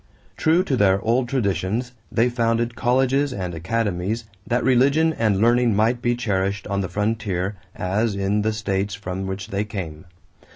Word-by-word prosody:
True 165 Hz, +3 st, +3 dB
to 140 Hz, -, 0 dB
their 100 Hz, -4 st, +3 dB
old 120 Hz, +2 st, +1 dB
traditions, 110 Hz, 0 st, -1 dB, 0.2 s
they 115 Hz, +2 st, +3 dB
founded 120 Hz, -1 st, 0 dB
colleges 130 Hz, +3 st, +2 dB
and 90 Hz, -5 st, -4 dB
academies 100 Hz, +4 st, -1 dB, 0.2 s
that 120 Hz, +1 st, +1 dB
religion 140 Hz, +6 st, +3 dB
and 110 Hz, -7 st, +1 dB
learning 120 Hz, 0 st, +3 dB
might 115 Hz, +4 st, +2 dB
be 120 Hz, 0 st, +1 dB
cherished 100 Hz, -4 st, -1 dB
on 100 Hz, 0 st, -1 dB
the 90 Hz, -, -3 dB
frontier 105 Hz, -3 st, -1 dB, 0.2 s
as 100 Hz, +3 st, 0 dB
in 100 Hz, +1 st, 0 dB
the 110 Hz, +1 st, +1 dB
states 100 Hz, -2 st, -2 dB
from 95 Hz, -2 st, -5 dB
which 95 Hz, +3 st, -5 dB
they 100 Hz, 0 st, -1 dB
came. 85 Hz, -7 st, -6 dB
110 Hz, 160 wpm, -23 LUFS, 95-120 Hz, 0.2 s, True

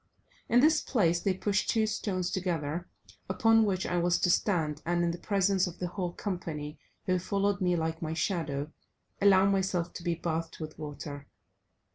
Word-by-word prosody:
In 245 Hz, -, +5 dB
this 310 Hz, +1 st, +5 dB
place 175 Hz, -8 st, +2 dB
they 190 Hz, +1 st, 0 dB
pushed 205 Hz, +2 st, 0 dB
two 220 Hz, -1 st, +3 dB
stones 195 Hz, -4 st, -2 dB
together, 175 Hz, -2 st, -2 dB, 0.4 s
upon 225 Hz, -1 st, +4 dB
which 190 Hz, -2 st, 0 dB
I 180 Hz, -, -1 dB
was 175 Hz, 0 st, +2 dB
to 180 Hz, -, +4 dB
stand, 160 Hz, -7 st, +1 dB
and 175 Hz, +1 st, +1 dB
in 170 Hz, -, +1 dB
the 170 Hz, -, -6 dB
presence 195 Hz, -2 st, +2 dB
of 175 Hz, -, -8 dB
the 180 Hz, -, -3 dB
whole 180 Hz, -1 st, -3 dB
company, 160 Hz, -7 st, -5 dB, 0.3 s
who 185 Hz, -2 st, +1 dB
followed 200 Hz, +2 st, 0 dB
me 180 Hz, -1 st, +2 dB
like 160 Hz, -1 st, -2 dB
my 160 Hz, -1 st, -3 dB
shadow, 155 Hz, -5 st, -2 dB, 0.5 s
allow 195 Hz, -1 st, +6 dB
myself 190 Hz, -3 st, 0 dB
to 170 Hz, -, -8 dB
be 170 Hz, -1 st, 0 dB
bathed 165 Hz, 0 st, -3 dB
with 155 Hz, -1 st, -7 dB
water. 145 Hz, -1 st, -7 dB
180 Hz, 175 wpm, -30 LUFS, 165-195 Hz, 0.5 s, allow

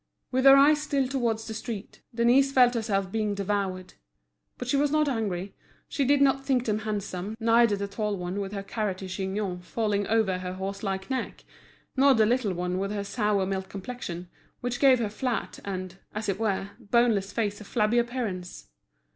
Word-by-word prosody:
With 260 Hz, +1 st, +1 dB
her 270 Hz, 0 st, +10 dB
eyes 295 Hz, +2 st, +6 dB
still 280 Hz, -3 st, 0 dB
towards 235 Hz, -4 st, -1 dB
the 220 Hz, -, -5 dB
street, 220 Hz, -1 st, -6 dB
Denise 245 Hz, +4 st, +4 dB
felt 250 Hz, -2 st, +5 dB
herself 200 Hz, -5 st, -1 dB
being 215 Hz, -1 st, -1 dB
devoured. 195 Hz, -2 st, -2 dB, 0.6 s
But 250 Hz, -, -6 dB
she 260 Hz, -, +1 dB
was 290 Hz, +1 st, +3 dB
not 305 Hz, 0 st, +2 dB
angry; 200 Hz, -7 st, -2 dB, 0.3 s
she 280 Hz, -, -1 dB
did 280 Hz, +1 st, +4 dB
not 270 Hz, 0 st, +2 dB
think 260 Hz, -3 st, +1 dB
them 215 Hz, -1 st, 0 dB
handsome, 210 Hz, -1 st, -4 dB
neither 230 Hz, -1 st, +4 dB
the 200 Hz, 0 st, -3 dB
tall 205 Hz, 0 st, -2 dB
one 180 Hz, +2 st, -4 dB
with 195 Hz, -1 st, -4 dB
her 200 Hz, -1 st, -4 dB
carroty 195 Hz, -2 st, -3 dB
chignon 190 Hz, -1 st, -3 dB
falling 205 Hz, +1 st, -1 dB
over 210 Hz, -5 st, +2 dB
her 180 Hz, 0 st, -4 dB
horse 195 Hz, +1 st, -5 dB
like 195 Hz, +3 st, -3 dB
neck, 260 Hz, -, -3 dB, 0.5 s
nor 275 Hz, 0 st, +5 dB
the 220 Hz, -1 st, +4 dB
little 230 Hz, -3 st, +1 dB
one 180 Hz, +1 st, -2 dB
with 195 Hz, +1 st, -1 dB
her 205 Hz, -1 st, -3 dB
sour 205 Hz, -2 st, 0 dB
milk 190 Hz, 0 st, -3 dB
complexion, 190 Hz, -4 st, -6 dB, 0.3 s
which 245 Hz, 0 st, -3 dB
gave 270 Hz, -2 st, +6 dB
her 230 Hz, -3 st, -1 dB
flat 230 Hz, +2 st, -3 dB
and, 185 Hz, -1 st, -5 dB, 0.2 s
as 215 Hz, 0 st, -3 dB
it 195 Hz, 0 st, -1 dB
were, 200 Hz, -2 st, -1 dB
boneless 225 Hz, -3 st, +2 dB
face 210 Hz, -2 st, -2 dB
a -, -, -7 dB
flabby 215 Hz, +2 st, +1 dB
appearance. 225 Hz, -, -4 dB
210 Hz, 185 wpm, -27 LUFS, 195-245 Hz, 0.6 s, her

